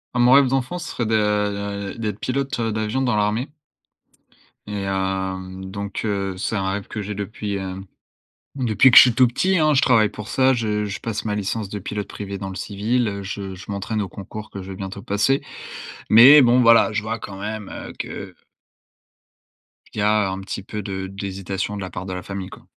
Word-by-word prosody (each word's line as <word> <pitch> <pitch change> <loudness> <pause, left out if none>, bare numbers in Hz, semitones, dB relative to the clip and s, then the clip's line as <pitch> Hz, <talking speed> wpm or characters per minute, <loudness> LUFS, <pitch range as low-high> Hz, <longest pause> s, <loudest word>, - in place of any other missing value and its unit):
Ah - - +1
mon 120 +1 +6
rêve 140 0 +7
d'enfant 135 +6 -1
se 170 - -6
serait 120 - -2
de, 110 - +2
heu 100 -1 -1
d'être 105 -3 -3
pilote, 135 +1 -2
heu, 115 -1 0
d'avion 110 +4 -1
dans 125 -4 +1
l'armée. 110 +7 0 1.1
Et 105 -1 -4
hem 95 -1 -3
donc 100 +1 -5
heu, 100 -2 -2
c'est 110 - -2
un 95 -1 0
rêve 100 0 -4
que 105 - -5
j'ai 105 0 -5
depuis, 105 0 -4
hem, 95 0 -5 0.7
depuis 125 0 +4
que - - +4
je - - +14
suis 125 -3 +5
tout 125 +1 +5
petit 185 +10 +1
hein. 155 -1 +4
Je 135 - +4
travaille 115 -5 +5
pour 105 -1 -9
ça, 130 0 +3
je 105 -3 -1
je 100 0 -5
passe 115 -1 -4
ma 105 -1 -1
licence 105 +1 -2
de 105 +1 -5
pilote 105 +1 -4
privé 100 -1 -6
dans 95 - -5
le 95 - -7
civil, 110 +4 -1
heu, 100 0 -5
je 95 -1 -5
je 90 - -11
m'entraîne 100 +2 -2
au 100 - -3
concours 105 +4 -9
que 100 - -7
je 95 - -9
vais - - -6
bientôt 100 +1 -6
passer, 105 +9 +1 0.7
mais 130 +7 +9
bon, 125 +1 +5
voilà, 115 -1 +6
je 105 0 -2
vois 115 +1 -3
quand 100 -2 -8
même, 105 0 -5
heu, - - -8
que - - -6 1.6
qu'il - - -6
y - - +1
a 105 -2 +3
un 95 - -4
petit 95 0 -6
peu 105 +1 -5
de 95 -1 -4
d'hésitation 95 0 -4
de - - -5
la 95 - -5
part 90 +1 -6
de 95 - -5
la 90 - -5
famille, 100 -2 -6
quoi. - - -13
105 Hz, 215 wpm, -22 LUFS, 95-115 Hz, 1.6 s, je